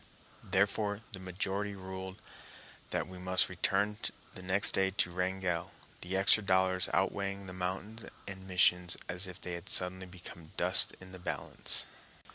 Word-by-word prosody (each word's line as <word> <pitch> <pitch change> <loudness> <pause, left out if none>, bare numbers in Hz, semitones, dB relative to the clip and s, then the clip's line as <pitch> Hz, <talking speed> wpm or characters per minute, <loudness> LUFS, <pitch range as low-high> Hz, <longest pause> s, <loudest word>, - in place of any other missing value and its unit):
Therefore, 100 +2 +1
the 95 - -7
majority 95 +2 -2
ruled 95 +1 -7 0.7
that - - -1
we 90 0 -9
must 90 0 +2
return 95 +3 +1 0.4
next 95 +3 +4
day 95 0 +2
to 95 -2 +1
Wrangell, 90 -1 -1 0.3
the 95 +2 -2
extra 100 +2 +6
dollars 95 -2 +2
outweighing 100 0 0
the 90 - -7
mountains 95 +5 -4 0.2
and 95 -1 -7
missions 90 -1 +3
as 90 +2 -2
if 90 - -9
they 90 - -5
had 85 0 -6
suddenly 95 0 +1
become 90 -3 -11
dust - - +5
in 95 0 -12
the 95 - -9
balance. - - -1
95 Hz, 145 wpm, -33 LUFS, 90-95 Hz, 0.7 s, extra